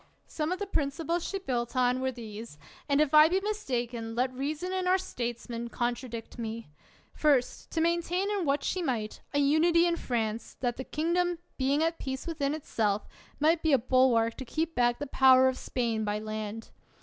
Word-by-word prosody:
42 - - -31 0.2
ELIOT - - -25
Some 310 +1 -2
of 365 - 0
the 405 - -3
principles 330 0 -1
she 395 - -2
built 245 -9 -3
on, 250 0 +2
were 260 0 0
these; 225 -6 -9 0.3
and 280 0 +3
if 305 -1 +2
I 305 +1 +8
be 370 +2 +2
mistaken, 245 - -3
let 255 +2 0
reason 300 +7 -3
and 370 -1 -1
our 370 +1 +5
statesmen 235 -7 -4
contradict 240 -1 -4
me: 225 -4 -5 0.4
First, 280 -5 +1
to 325 - +1
maintain, 340 +3 +1
in 405 -3 0
what 280 -2 +1
she 370 - -1
might, 235 -9 -2
a 285 - -1
unity 320 +4 +4
in 340 -1 +1
France, 225 -4 -3
that 245 -2 -1
that 260 - -7
kingdom, 345 +3 +1 0.2
being 280 +3 +1
at 330 +1 0
peace 265 -1 -4
within 305 -4 -1
itself, 215 -8 -1 0.3
might 320 +2 +3
be 320 -2 +2
a - - +7
bulwark 245 -2 +3
to - - -5
keep 315 +6 -2
back 240 -2 +2
the 290 - -4
power 260 -1 +6
of 260 - +1
Spain 230 -4 -2
by 210 0 -1
land. 215 +1 -5
265 Hz, 195 wpm, -29 LUFS, 235-325 Hz, 0.4 s, I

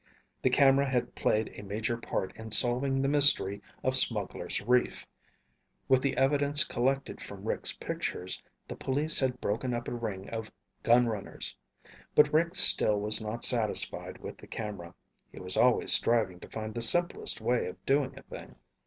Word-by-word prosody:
The - - +2
camera 135 +1 +4
had 125 -2 -1
played 110 0 0
a - - -9
major 105 +3 -3
part 95 -5 -4
in 110 0 -9
solving 130 +4 +2
the - - +1
mystery 140 -9 +2 0.2
of 130 0 +1
Smugglers' 105 -7 -1
Reef. 125 +3 0 0.8
With 130 -1 +4
the 140 - -1
evidence 145 +2 +3
collected 135 +3 -2
from - - -9
Rick's - - 0
pictures, 90 +1 -4 0.3
the - - -7
police 150 +4 +1
had 130 -2 -1
broken 120 +4 -2
up 120 +1 -5
a - - -4
ring 105 -5 -5
of 110 -1 -5 0.3
gunrunners. 115 -4 0 0.6
But 150 0 +5
Rick 170 +3 +2
still 105 - +6
was 105 +2 0
not 110 +2 -4
satisfied 115 -4 0
with - - -9
the - - -14
camera. 100 -6 -7 0.4
He - - -11
was 90 0 -2
always 125 -1 +4
striving 110 -7 +1
to - - -12
find 110 0 -6
the 120 - -4
simplest 175 +9 +2
way 120 +2 0
of 90 +1 -10
doing 135 -1 0
a - - -11
thing. - - -11
120 Hz, 165 wpm, -29 LUFS, 105-135 Hz, 0.8 s, still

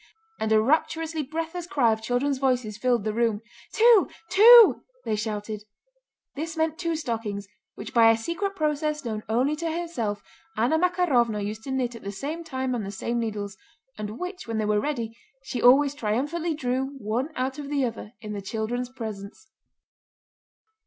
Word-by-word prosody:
and 220 - -1
a 220 - +6
rapturously 315 +5 +1
breathless 330 +4 -4
cry 260 -11 +3
of 220 - -5
children's 255 +4 0
voices 250 -5 0
filled 240 0 +1
the 215 0 -1
room. 225 -2 +1 0.3
"Two, 455 -3 +5 0.2
two!" 455 +3 +8 0.2
they 215 - 0
shouted. 210 0 -4 0.7
This 320 +3 -5
meant 320 0 0
two 335 -2 -1
stockings, 225 -8 -3 0.3
which - - -8
by 230 -1 +7
a 225 - +4
secret 340 - -3
process 300 -2 -1
known 215 -2 -3
only 255 +7 +2
to 330 +1 -2
herself 250 -12 -3 0.3
Anna 245 +9 +2
Makárovna 270 - +2
used 215 +1 -5
to 270 - -4
knit 255 -2 -1
at 230 - -10
the 200 - -5
same 295 +12 -5
time 260 -4 -3
on 240 - -1
the 195 - -5
same 235 +4 -2
needles, 205 -3 -4 0.4
and 215 +1 -6
which, 360 -3 -6
when 225 -1 -2
they 215 - 0
were 210 0 +2
ready, 235 -6 -3 0.3
she 255 - -4
always 275 +3 +6
triumphantly 295 +8 -1
drew, 265 0 -2
one 245 +4 -2
out 260 +2 -2
of 285 -1 -6
the 280 -3 +1
other, 230 -2 -6
in 210 -1 -6
the 205 - -4
children's 225 +5 -3
presence. 220 -3 -8
250 Hz, 175 wpm, -26 LUFS, 220-310 Hz, 0.7 s, two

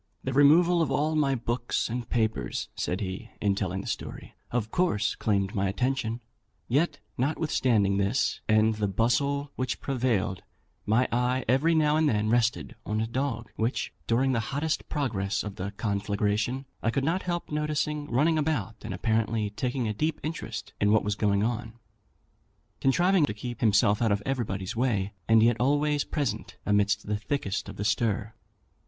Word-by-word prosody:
"The 130 - -2
removal 165 +5 +5
of 150 +1 +1
my 135 -2 +2
books 120 0 -1
and 120 0 -4
papers," 110 -2 -1
said 90 +4 -2
he, 100 +4 -5
in 100 -2 +2
telling 95 -1 -2
the - - -11
story, - - -5 0.2
"of 110 -2 -2
course 170 - +1
claimed 100 -3 0
my 100 -1 0
attention; 120 +1 -1 0.5
yet, 145 +4 +1 0.2
notwithstanding 125 -8 +2
this, 100 0 0
and 110 +1 +4
the 105 -1 -1
bustle 140 +7 +1
which 130 0 -2
prevailed, 120 -8 0 0.5
my 115 +4 +3
eye 125 +1 +1
every 140 +7 +3
now 155 -1 +3
and 155 -1 +3
then 110 -1 +1
rested 115 - +1
on 110 0 -2
a 110 - +1
dog, 120 -1 -3
which, 115 +4 -1
during 130 +3 +2
the 120 - +1
hottest 150 +2 -2
progress 105 -9 -1
of 105 0 -7
the 95 0 -3
conflagration, 105 +4 -1 0.2
I 115 - +1
could 135 +4 0
not 175 +4 +1
help 175 -2 -3
noticing 150 0 -1
running 155 +6 +3
about, 130 -9 -1
and 95 - -5
apparently 110 +1 0
taking 125 +2 -2
a 105 - -1
deep 155 +9 -1
interest 160 +2 -5
in 105 0 +4
what 110 - +4
was 105 - 0
going 100 -1 +1
on; 115 0 -2 1.1
contriving 175 +4 +3
to 105 - -4
keep 120 +2 -6
himself 105 -1 +4
out 115 -2 +3
of 100 0 0
everybody's 105 -8 -2
way, 110 -5 0 0.2
and 110 -1 +6
yet 115 0 +4
always 145 +3 +2
present 115 -8 -3
amidst 105 0 +2
the 105 0 -1
thickest 105 -3 -3
of - - -8
the 100 - -4
stir. 110 -1 0
115 Hz, 165 wpm, -28 LUFS, 105-140 Hz, 1.1 s, and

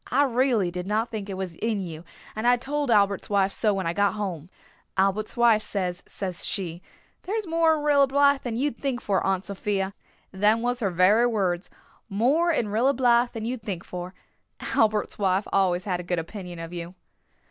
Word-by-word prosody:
I 280 +3 +3
reely 245 -7 +1
did 180 +1 -5
not 220 +3 0
think 210 -3 -5
it 195 - -4
was 190 -3 -4
in 220 -2 -1
you 165 -4 -6 0.3
and 220 +2 -1
I 245 0 +5
told 285 +2 -2
Albert's 200 -3 +2
wife 200 -1 +2
so 215 +1 +1
when 195 -2 -2
I 165 - 0
got 200 +2 +2
home. 180 -6 -4 0.5
Albert's 195 +4 0
wife 235 -3 +5
says, 180 -4 -3
says 185 -3 -4
she, 175 -4 -3 0.4
'There's 425 +2 -3
more 330 -1 +3
in 300 - -4
Rilla 285 -2 +4
Blythe 280 0 +3
than 240 -3 -4
you'd 260 0 -1
think 270 -3 -2
for, 200 -5 0
Aunt 190 0 0
Sophia.' 195 0 -2 0.4
Them 210 +4 +2
was 245 0 0
her 205 -5 0
very 190 +7 +4
words. 190 -6 -1 0.4
'More 270 - +2
in 235 -9 0
Rilla 240 +7 +2
Blythe 240 -1 +3
than 225 -1 -5
you'd 245 0 -3
think 195 -5 -5
for.' 180 +1 -7 0.4
Albert's 215 -1 0
wife 195 0 +1
always 185 -2 +2
had 180 -3 -2
a 180 - -9
good 175 - +1
opinion 175 +1 -6
of 165 +1 -7
you." 175 +1 -6
210 Hz, 195 wpm, -25 LUFS, 185-245 Hz, 0.5 s, I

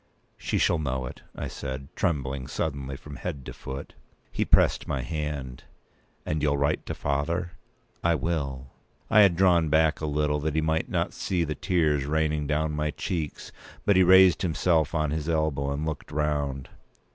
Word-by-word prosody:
"She - - -2
shall 85 - +2
know 65 -3 -2
it," 60 - -8
I - - -4
said, 65 0 -6
trembling 70 -5 -1
suddenly 70 -3 -3
from 70 +1 -10
head 70 -8 -5
to - - -7
foot. 65 +2 -7 0.4
He - - 0
pressed - - +3
my 65 -2 -2
hand. 70 -3 -4 0.6
"And 75 0 -1
you'll 70 -1 +2
write 70 +2 0
to - - -3
father?" 85 +5 -1 0.5
"I 85 -1 +3
will." 70 -4 -3 0.4
I 110 - +7
had 100 -4 +6
drawn 85 -4 +3
a 80 0 +3
little 75 0 0
back, - - -7
that 80 -1 0
he 80 - +2
might 80 +1 0
not - - -1
see 90 -3 -1
the 75 -1 -2
tears 75 -4 +1
raining 75 -1 0
down 75 +1 0
my 75 0 -1
cheeks; 75 +1 -4 0.3
but 100 - +4
he 95 - +6
raised 95 -1 +7
himself 80 -2 +1
on 75 -2 +1
his 80 +1 -2
elbow, 75 -4 0
and 75 +2 -2
looked 80 -2 -5
round. 70 -3 -1
75 Hz, 175 wpm, -27 LUFS, 70-80 Hz, 0.6 s, I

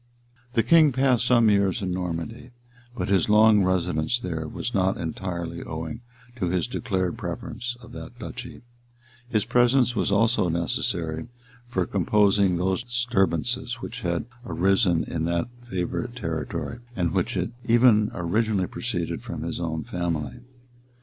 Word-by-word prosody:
The 115 - +3
king 155 +4 +6
passed 125 -2 +2
some 120 -3 +5
years 100 -3 +3
in 90 - -1
Normandy; 90 +7 -4 0.5
but - - -1
his 95 0 +2
long 105 -1 +6
residence 90 +1 +1
there 80 -8 -4
was 120 +9 -4
not 95 -2 +2
entirely 85 0 -4
owing 80 +8 -5 0.4
to 95 -6 -1
his 90 -1 +1
declared 95 -7 -2
preference 120 0 -5
of 115 - -12
that 120 - -9
duchy: 125 0 -8 0.7
his 110 -4 +1
presence 125 0 +3
was 105 - 0
also 110 -2 +3
necessary 80 +1 -1 0.4
for 95 -6 0
composing 100 0 +3
those 95 +3 0
disturbances 120 0 0
which 120 +1 -7
had 85 -2 -1 0.2
arisen 95 -5 +2
in 80 -1 -3
that 85 +7 0 0.2
favorite 105 +6 -3
territory, 80 - -4 0.2
and 85 -3 0
which 95 +1 0
had 90 +4 -1 0.2
even 115 -2 +5
originally 100 +2 +1
proceeded - - -3
from - - -6
his - - -3
own 80 -2 -2
family. 85 +4 -3
95 Hz, 140 wpm, -25 LUFS, 85-120 Hz, 0.7 s, king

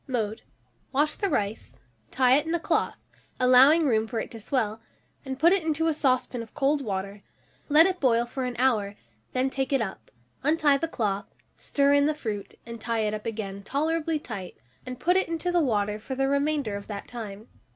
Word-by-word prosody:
Mode. 220 -5 -2 0.5
Wash 295 +3 +2
the 400 - 0
rice, 205 - -3 0.3
tie 255 0 +4
it 295 +3 +1
in 330 - 0
a - - 0
cloth, - - 0 0.4
allowing 260 +6 +6
room 225 -4 +2
for 230 -1 -3
it - - -5
to 230 - -8
swell, 220 -2 -1 0.4
and 265 -2 -5
put 335 +6 +5
it 390 - +2
into 320 0 0
a 325 - +2
saucepan 255 -4 0
of 225 - -11
cold 285 0 +2
water; 200 -1 -4 0.5
let 305 +3 +7
it 370 -1 0
boil 240 -3 +3
for 255 +2 -4
an 250 -1 -4
hour, 220 -6 +1 0.4
then 260 +1 0
take 270 0 -2
it 275 - +3
up, 215 -5 -5 0.3
untie 295 -1 +3
the 330 - -1
cloth, 205 -8 -2 0.3
stir 280 0 +1
in 285 0 +4
the 305 - 0
fruit, 215 -8 -5
and 230 -1 -8
tie 230 0 -1
it 210 -1 0
up 215 +1 -5
again 200 -3 -5
tolerably 315 +7 -1
tight, 200 -10 -7 0.3
and 255 -1 -6
put 360 +2 +2
it 380 - +2
into 335 +2 -2
the 350 -1 +3
water 210 -4 0
for 260 +5 -6
the 270 +1 +1
remainder 280 -5 0
of 200 - -7
the 205 -2 -5
time. 220 -2 -8
255 Hz, 205 wpm, -26 LUFS, 220-295 Hz, 0.5 s, let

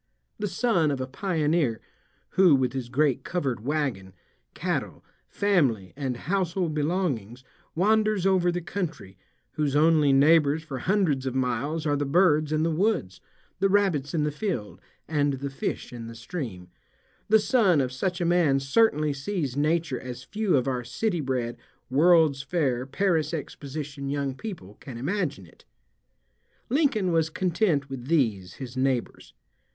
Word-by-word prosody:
The 210 - -1
son 185 -7 +1
of 140 -2 -2
a 130 - -2
pioneer 150 - 0 0.5
who, 185 -6 +5
with 130 -2 0
his 130 -3 -4
great 140 +1 +1
covered 135 -11 -2
wagon, 130 -10 -2 0.4
cattle, - - -3 0.2
family, 135 - +1
and 135 -3 -3
household 180 0 -1
belongings, 145 - -2 0.3
wanders 215 +1 +2
over 185 -2 +3
the 175 0 -3
country, 165 - -5 0.4
whose 145 -2 -1
only 155 -1 +4
neighbors 150 +2 +4
for 140 -5 -6
hundreds 165 -7 +1
of 130 - -3
miles 130 +5 -1
are 145 -1 +2
the 145 0 -1
birds 155 -1 +3
in 155 0 +1
the 165 - +1
woods, 165 - 0 0.4
the 195 +1 +3
rabbits 180 -8 +1
in 155 - +1
the 150 - 0
field, 145 - -4 0.3
and 145 -2 +1
the 135 +1 -4
fish 135 - -4
in 115 -1 -7
the 115 - -9
stream, 115 - -6 0.6
the 220 - +7
son 210 - +3
of 130 -2 0
such 175 +8 -2
a 175 - 0
man 170 -5 +3
certainly 150 0 +2
sees 140 -2 -3
nature 155 -1 0
as 125 0 -8
few 205 -1 0
of 130 - 0
our 125 -2 -1
city 175 - -2
bred, 125 -4 -2 0.3
World's 155 -1 +4
Fair, 135 -6 -1
Paris 165 -1 0
Exposition 140 -1 -6
young 140 -1 -1
people, 135 - -8
can 130 -4 -9
imagine 145 - -2
it. 80 - -21 1.1
Lincoln 245 - +2
was 160 -1 +2
content 170 -4 0
with 130 -2 -7
these, 110 - +1
his 130 -2 -8
neighbors. 130 -2 -2
150 Hz, 150 wpm, -26 LUFS, 130-175 Hz, 1.1 s, the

